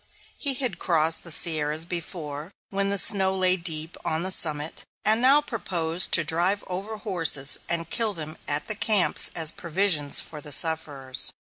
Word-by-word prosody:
He 280 Hz, -2 st, +1 dB
had 255 Hz, -1 st, -2 dB
crossed 165 Hz, -2 st, +1 dB
the 170 Hz, -, -10 dB
Sierras 155 Hz, -1 st, +2 dB
before, 165 Hz, -3 st, -6 dB, 0.2 s
when 200 Hz, 0 st, -2 dB
the 200 Hz, -, +1 dB
snow 190 Hz, -2 st, +2 dB
lay 185 Hz, -1 st, +2 dB
deep 165 Hz, -2 st, 0 dB
on 160 Hz, +1 st, -1 dB
the 190 Hz, -, -1 dB
summit, 155 Hz, -3 st, +2 dB, 0.2 s
and 220 Hz, +2 st, +3 dB
now 275 Hz, +4 st, +5 dB
proposed 175 Hz, -, 0 dB
to 170 Hz, -, +6 dB
drive 175 Hz, +6 st, 0 dB
over 195 Hz, +4 st, -6 dB
horses 165 Hz, -9 st, -1 dB
and 165 Hz, -1 st, -2 dB
kill 220 Hz, +2 st, -1 dB
them 155 Hz, -1 st, -5 dB
at 145 Hz, +1 st, +2 dB
the -, -, -1 dB
camps 210 Hz, -2 st, +1 dB
as 160 Hz, -2 st, +2 dB
provisions 170 Hz, -4 st, 0 dB
for 150 Hz, -2 st, -7 dB
the 150 Hz, -, -10 dB
sufferers. 145 Hz, -4 st, +1 dB
170 Hz, 165 wpm, -24 LUFS, 155-195 Hz, 0.2 s, to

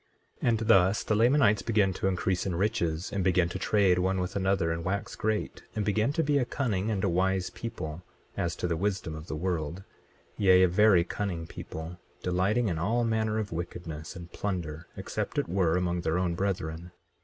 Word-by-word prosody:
24:7 -, -, +2 dB
And 115 Hz, -, +3 dB
thus 95 Hz, -2 st, +4 dB
the -, -, 0 dB
Lamanites 115 Hz, -2 st, +4 dB
began 105 Hz, -4 st, +2 dB
to 95 Hz, -, -1 dB
increase 95 Hz, 0 st, 0 dB
in 90 Hz, -, -1 dB
riches, 85 Hz, -4 st, -1 dB
and 100 Hz, -2 st, 0 dB
began 90 Hz, -1 st, +3 dB
to 95 Hz, -, -5 dB
trade 95 Hz, -2 st, +3 dB
one 95 Hz, +1 st, +1 dB
with 90 Hz, 0 st, -3 dB
another 95 Hz, -3 st, +1 dB
and 80 Hz, 0 st, -3 dB
wax 95 Hz, +3 st, -2 dB
great, 110 Hz, 0 st, -2 dB
and 105 Hz, -2 st, -1 dB
began 110 Hz, +4 st, +2 dB
to 165 Hz, -, +1 dB
be 145 Hz, -1 st, +2 dB
a -, -, +2 dB
cunning 110 Hz, -7 st, -1 dB
and 100 Hz, -4 st, -1 dB
a -, -, +3 dB
wise 95 Hz, +1 st, +1 dB
people, 85 Hz, -8 st, -6 dB, 0.3 s
as 85 Hz, -, -1 dB
to -, -, -2 dB
the 85 Hz, -, 0 dB
wisdom 95 Hz, -2 st, -2 dB
of 80 Hz, +1 st, -8 dB
the -, -, -4 dB
world, 85 Hz, +1 st, -2 dB, 0.6 s
yea, 95 Hz, -2 st, +6 dB
a -, -, +6 dB
very 95 Hz, 0 st, +5 dB
cunning 90 Hz, -2 st, -3 dB
people, 80 Hz, +1 st, -8 dB, 0.2 s
delighting 95 Hz, +6 st, +1 dB
in 85 Hz, -5 st, -1 dB
all 115 Hz, +8 st, +1 dB
manner 110 Hz, -1 st, 0 dB
of 110 Hz, -2 st, -3 dB
wickedness 80 Hz, -2 st, -6 dB
and 85 Hz, 0 st, -9 dB
plunder, 85 Hz, -5 st, -4 dB
except -, -, -4 dB
it -, -, +1 dB
were 90 Hz, -2 st, +2 dB
among 90 Hz, -1 st, 0 dB
their 80 Hz, +1 st, 0 dB
own 90 Hz, -1 st, 0 dB
brethren. 85 Hz, -2 st, -3 dB
95 Hz, 200 wpm, -29 LUFS, 85-105 Hz, 0.6 s, yea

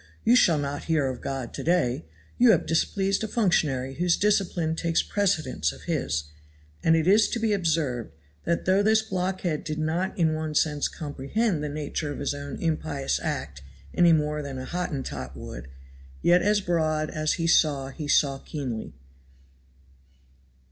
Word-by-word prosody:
you 240 Hz, -, +5 dB
shall 170 Hz, -10 st, +5 dB
not 145 Hz, 0 st, -3 dB
hear 160 Hz, -4 st, +1 dB
of 130 Hz, -2 st, -3 dB
God 135 Hz, -3 st, -4 dB
to -, -, -5 dB
day 140 Hz, -, +1 dB, 0.3 s
you 245 Hz, 0 st, +6 dB
have 190 Hz, -8 st, +4 dB
displeased 195 Hz, +5 st, 0 dB
a -, -, -1 dB
functionary 150 Hz, -, +1 dB
whose 175 Hz, +4 st, +1 dB
discipline 180 Hz, -6 st, +1 dB
takes 165 Hz, 0 st, +1 dB
precedence 155 Hz, -, 0 dB
of -, -, -13 dB
His;" 80 Hz, -, -1 dB, 0.6 s
and 165 Hz, -, +5 dB
it 160 Hz, -1 st, +1 dB
is 210 Hz, +3 st, +5 dB
to 235 Hz, -, -2 dB
be 220 Hz, -2 st, +1 dB
observed, 155 Hz, -, 0 dB, 0.3 s
that 170 Hz, -, -1 dB
though 190 Hz, +2 st, +4 dB
this 220 Hz, +1 st, +3 dB
blockhead 185 Hz, -5 st, -2 dB
did 155 Hz, -1 st, -4 dB
not 160 Hz, +4 st, -1 dB
in 160 Hz, -3 st, +2 dB
one 155 Hz, -1 st, -3 dB
sense 150 Hz, -1 st, +2 dB
comprehend 155 Hz, -, -2 dB
the 150 Hz, -, -2 dB
nature 150 Hz, 0 st, -3 dB
of -, -, -5 dB
his 145 Hz, -, -2 dB
own 140 Hz, 0 st, -6 dB
impious 155 Hz, -4 st, -1 dB
act 70 Hz, 0 st, -4 dB, 0.3 s
any 175 Hz, -1 st, +5 dB
more 150 Hz, -1 st, +1 dB
than 140 Hz, -2 st, -6 dB
a 130 Hz, -, -5 dB
Hottentot 130 Hz, -, -4 dB
would, -, -, -8 dB, 0.6 s
yet 175 Hz, +1 st, +5 dB
as 205 Hz, +1 st, +2 dB
broad 155 Hz, -4 st, 0 dB
as 155 Hz, 0 st, 0 dB
he 165 Hz, -, -2 dB
saw 145 Hz, -5 st, +3 dB
he 145 Hz, +2 st, -6 dB
saw 140 Hz, -2 st, +3 dB
keenly. 125 Hz, -, -5 dB
155 Hz, 165 wpm, -26 LUFS, 140-180 Hz, 0.6 s, you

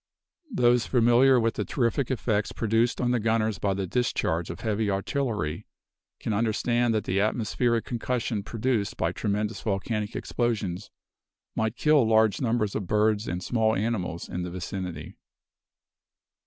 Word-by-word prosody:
Those 120 Hz, -, +3 dB
familiar 125 Hz, +1 st, +5 dB
with 115 Hz, -1 st, +1 dB
the -, -, -2 dB
terrific 125 Hz, 0 st, 0 dB
effects 110 Hz, -5 st, 0 dB
produced 115 Hz, +2 st, +1 dB
on 125 Hz, -1 st, +1 dB
the 125 Hz, -, +2 dB
gunners 110 Hz, -1 st, 0 dB
by 100 Hz, -1 st, 0 dB
the 95 Hz, 0 st, -2 dB
discharge 90 Hz, -6 st, -1 dB
of 85 Hz, -, -7 dB
heavy 110 Hz, -1 st, 0 dB
artillery, 100 Hz, -, -2 dB, 0.5 s
can 110 Hz, -, -2 dB
understand 115 Hz, +2 st, +1 dB
that 110 Hz, -, 0 dB
the 95 Hz, -, 0 dB
atmospheric 115 Hz, +2 st, 0 dB
concussion 120 Hz, -2 st, -2 dB
produced 115 Hz, 0 st, -1 dB
by 85 Hz, -, 0 dB
tremendous 105 Hz, +3 st, -2 dB
volcanic 105 Hz, +1 st, -2 dB
explosions 105 Hz, -6 st, -2 dB, 0.7 s
might 110 Hz, +1 st, -1 dB
kill 150 Hz, -2 st, +4 dB
large 110 Hz, -1 st, +3 dB
numbers 115 Hz, -4 st, 0 dB
of 100 Hz, -, -3 dB
birds 105 Hz, +1 st, +2 dB
and 90 Hz, +1 st, -3 dB
small 110 Hz, -2 st, +1 dB
animals 95 Hz, -5 st, -2 dB
in 90 Hz, -, -4 dB
the 90 Hz, -, -4 dB
vicinity. 90 Hz, -3 st, -6 dB
110 Hz, 140 wpm, -27 LUFS, 100-120 Hz, 0.7 s, familiar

